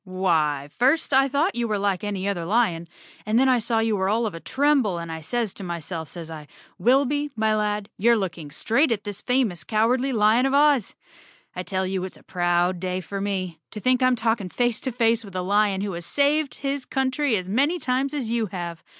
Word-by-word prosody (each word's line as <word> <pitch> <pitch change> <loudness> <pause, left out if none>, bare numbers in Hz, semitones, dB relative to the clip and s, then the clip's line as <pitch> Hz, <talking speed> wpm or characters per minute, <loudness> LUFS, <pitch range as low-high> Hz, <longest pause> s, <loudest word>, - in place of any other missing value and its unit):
"Why, 165 -7 0
first 270 +4 +2
I 270 +1 +5
thought 290 +7 +1
you 240 -1 -1
were 215 -2 0
like 200 -2 -1
any 200 -2 -2
other 190 -4 -1
lion, 175 -4 +1 0.4
112 - - -28
Chapter - - -5
Nine 215 - +1
then 265 +2 +4
I 250 -2 +4
saw 230 0 -1
you 220 -2 +1
were 190 -1 0
all 225 +3 +1
of 210 - -3
a 165 - -7
tremble, 270 - +1
and 170 -1 -6
I 160 0 -6
says 225 +5 -2
to 200 - -9
my¬ 170 -2 -4
self, 160 -2 -5
says 165 -2 -8
I, 155 -2 -9 0.3
'Wilby, 280 +4 +2
my 220 -1 +1
lad, 210 -1 -1
you're 235 +3 +4
looking 170 -6 -4
straight 235 - +1
at 210 -3 -1
this 205 -1 -6
famous 235 -11 0
Cowardly 240 - +1
Lion 225 +2 +3
of 270 - 0
Oz.' 285 -6 +3 0.6
I 180 - -3
tell 190 +1 -2
you 185 0 -2
it's 185 - -7
a - - -20
proud 175 0 0
day 185 0 -2
for 195 +2 -5
me. 185 -5 -3
To 215 - -7
think 255 +3 +2
I'm 255 0 +4
talking 225 -4 -1
face 240 +3 0
to 260 - -3
face 230 -1 +2
with 195 -3 -12
a 185 - -1
lion 200 0 +2
who 200 0 -2
has 170 0 -6
saved 290 +1 +1
his 275 0 -1
country 265 0 0
as 185 -3 -3
many 280 - +1
times 270 -1 -1
as 245 -6 -3
you 230 -2 0
have. 175 -3 -6
210 Hz, 230 wpm, -24 LUFS, 185-255 Hz, 0.6 s, I